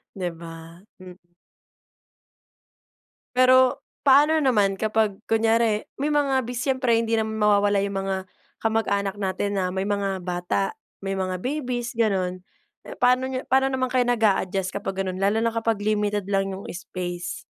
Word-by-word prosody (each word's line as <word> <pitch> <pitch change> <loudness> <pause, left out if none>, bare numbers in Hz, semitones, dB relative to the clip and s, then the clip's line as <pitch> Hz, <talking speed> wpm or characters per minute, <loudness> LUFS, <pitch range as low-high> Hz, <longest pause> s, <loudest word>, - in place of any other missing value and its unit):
Di 180 -3 -3
ba? 165 0 -11 0.2
Hmm. 180 -1 -14 2.0
Pero 255 0 +5 0.2
paano 290 +3 +6
naman 205 -7 +3
kapag 215 0 0
kunyari 225 -1 +1
may 295 +2 -1
mga 275 -3 +2
bis 245 +1 -5
siyempre 255 -3 +2
hindi 230 0 0
naman 220 -1 -1
mawawala 205 -1 +3
yung 195 -1 -2
mga 195 0 -1 0.4
kamag-anak 200 -3 0
natin 200 +1 -2
na 185 -1 0
may 190 +1 -2
mga 200 -2 -1
bata, 180 - -2 0.2
may 195 0 -3
mga 185 -1 -2
babies 250 -1 -3
ganun. 185 -5 0 0.6
Paano 250 +1 +3
niyo 255 - -2
paano 265 +1 +3
naman 260 -1 0
kayo 255 -1 +4
nag-adjust 195 -5 +1
kapag 195 -1 -4
ganun 185 0 -4
lalo 200 +3 +2
na 230 0 0
kapag 225 -2 0
limited 205 -1 0
lang 195 -1 0
yung 190 +1 -7
space? 175 -1 -5
205 Hz, 145 wpm, -24 LUFS, 190-240 Hz, 2.0 s, paano